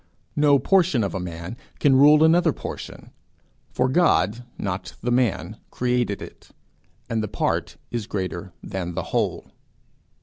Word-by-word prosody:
No 145 -1 +5
portion 175 - +3
of 100 - -2
a 95 - -2
man 85 +2 -6 0.2
can 140 -2 +4
rule 150 +3 +7
another 165 +2 +5
portion, - - -8 0.6
for 125 - +1
God, 125 - +2
not 95 0 -4
the 120 - -1
man, 110 -6 0
created 125 -4 -1
it, - - -13 0.6
and 115 -1 -1
the 110 - -2
part - - -2
is 115 -3 -3
greater 95 -2 -4
than 90 -3 -4
the - - -2
whole. - - -1
120 Hz, 140 wpm, -24 LUFS, 95-140 Hz, 0.6 s, rule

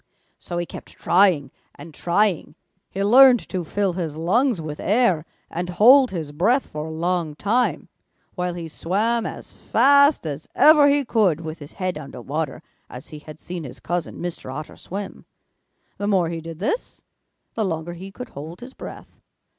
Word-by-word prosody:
So 175 - -6
he 175 - -1
kept - - -10
trying 175 -7 +3 0.2
and 150 +3 -12
trying. 175 -1 0 0.3
He 195 - -3
learned 250 +3 +7
to 185 -2 -2
fill 195 +3 -1
his 165 -4 -4
lungs 220 - +1
with 155 -2 -6
air 190 -6 +2 0.2
and 175 +2 -4
hold 250 +8 +6
his 160 -5 -5
breath 220 - +2
for 150 +1 -6
a - - -6
long 165 -1 -1
time, 230 +9 0 0.5
while 180 -1 -3
he 170 -2 -6
swam 215 +9 -1
as - - -9
fast 280 - +4
as 150 0 -5
ever 300 -1 +7
he 285 -1 +2
could 200 -9 +2
with 160 0 -7
his 145 -1 -11
head 185 -4 -3
under 140 -4 -9
water 145 +3 -4 0.3
as 125 - -10
he 155 - -9
had 155 +1 -12
seen 175 -2 -6
his 130 - -9
cousin, 175 0 -3
Mr. 170 -6 -5
Otter, 155 +4 -7
swim. 200 +2 -7 0.7
The 205 - -2
more 185 -5 +2
he 165 -1 -4
did 165 0 -8
this, 220 - -3 0.5
the 225 - -1
longer 170 -2 -3
he 190 +3 -9
could 250 +3 -9
hold 160 +5 -9
his 255 +2 -10
breath. - - -11
175 Hz, 175 wpm, -22 LUFS, 160-215 Hz, 0.7 s, learned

